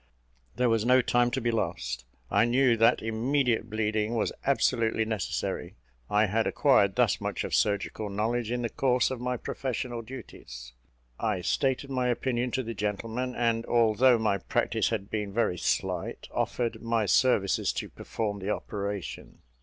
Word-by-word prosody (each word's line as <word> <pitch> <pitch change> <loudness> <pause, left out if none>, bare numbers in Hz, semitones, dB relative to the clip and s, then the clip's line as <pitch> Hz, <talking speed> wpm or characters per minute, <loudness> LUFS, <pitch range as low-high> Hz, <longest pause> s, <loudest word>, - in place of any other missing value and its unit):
There 125 +2 +2
was 115 -2 +2
no 125 +1 +5
time 120 0 +3
to 130 - -2
be 120 -1 0
lost; 65 - -2 0.3
I - - +4
knew 125 0 +3
that 115 +1 +3
immediate 115 +1 0
bleeding 110 +1 -1
was 115 - 0 0.2
absolutely 110 -1 +2
necessary. 105 - -3 0.3
I 105 +1 +3
had 110 +3 0
acquired - - +3
thus - - +2
much - - -2
of - - -5
surgical 105 +1 0
knowledge 110 +3 -1
in 120 0 -2
the 115 - -1
course 125 -2 +2
of 130 -2 -4
my 125 0 -1
professional 125 -1 -4
duties. 65 - -10 0.5
I 105 -5 -1
stated 135 +7 0
my 130 -1 0
opinion 125 0 0
to 130 - 0
the 115 0 -5
gentleman; 115 +5 -3
and 115 -1 +1
although 120 +2 +4
my 105 -3 +1
practice - - 0
had 105 -3 -3
been 105 -2 -2
very 90 -7 +1
slight, - - -2
offered 120 -2 -1
my 115 -2 0
services 100 -1 +3
to - - -4
perform 105 -2 -4
the 95 +1 -4
operation. 100 -2 -5
115 Hz, 160 wpm, -28 LUFS, 105-125 Hz, 0.5 s, no